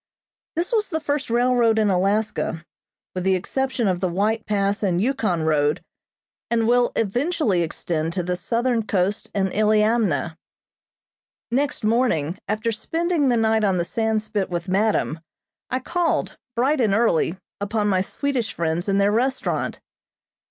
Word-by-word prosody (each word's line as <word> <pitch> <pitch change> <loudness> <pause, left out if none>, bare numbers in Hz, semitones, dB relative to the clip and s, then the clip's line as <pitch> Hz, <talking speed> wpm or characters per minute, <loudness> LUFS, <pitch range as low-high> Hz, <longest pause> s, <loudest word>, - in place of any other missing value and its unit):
This 345 +8 -1
was 430 -2 +1
the 320 -4 -1
first 290 -3 -2
railroad 240 -1 +3
in 215 -2 +3
Alaska 195 -3 0 0.5
with 185 - -3
the 190 0 +3
exception 260 +4 -1
of 185 -2 0
the 185 - +1
White 215 +5 0
Pass 200 0 0
and 180 -4 +1
Yukon 215 -8 0
road, 150 -1 +1 0.7
and 230 -1 +1
will 245 0 +3
eventually 235 - +1
extend 165 0 -2
to 180 -1 -1
the 180 +1 -1
southern 230 +5 0
coast 195 +2 0
and 190 -1 +1
Iliamna. 210 - +2 1.1
Next 275 0 0
morning, 215 - +1
after 215 +2 -1
spending 325 +6 0
the 240 - +3
night 220 -1 +2
on 195 -3 +2
the 170 - 0
Sandspit 215 -1 -1
with 175 -1 -3
madam, 195 -4 +1 0.5
I 255 - 0
called, 335 +6 -1 0.2
bright 265 +4 +2
and 210 -4 +2
early, 190 -6 +2 0.2
upon 205 +1 -1
my 190 -2 +2
Swedish 250 +2 -2
friends 170 +3 -1
in 195 - +2
their 200 +1 +3
restaurant. 255 +5 -1
215 Hz, 145 wpm, -23 LUFS, 185-245 Hz, 1.1 s, railroad